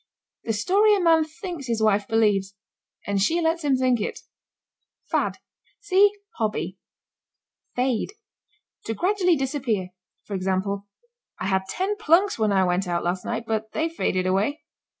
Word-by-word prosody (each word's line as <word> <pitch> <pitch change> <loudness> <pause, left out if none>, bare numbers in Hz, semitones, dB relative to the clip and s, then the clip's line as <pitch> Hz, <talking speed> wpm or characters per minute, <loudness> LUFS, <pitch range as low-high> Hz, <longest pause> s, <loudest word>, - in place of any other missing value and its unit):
The 225 - 0
story 400 - +4
a - - 0
man 325 -3 +4
thinks 320 -2 -7
his 230 -2 0
wife 205 -1 +2
believes 205 -3 +2 0.5
and 200 -1 0
she 325 - +2
lets 330 0 0
him 280 -2 +3
think 255 -3 +2
it. - - -4 0.9
FAD. - - 0 0.4
See 410 0 +5 0.3
hobby. 210 -4 -2 1.0
FADE. 250 - 0 0.7
To 225 - -2
gradually 365 - +2
disappear. 260 -9 -1 0.3
For 205 - -8
example: 195 +1 -1 0.5
"I - - -3
had 190 0 +1
ten 395 - -1
plunks 380 - +3
when 215 -1 +2
I 190 -1 +3
went 180 +1 0
out 170 -1 -1
last 180 +1 -1
night, 230 -1 -2
but 220 -1 -3
they 320 +1 0
faded 185 - -1
away." 200 +12 0
225 Hz, 150 wpm, -24 LUFS, 200-330 Hz, 1.0 s, See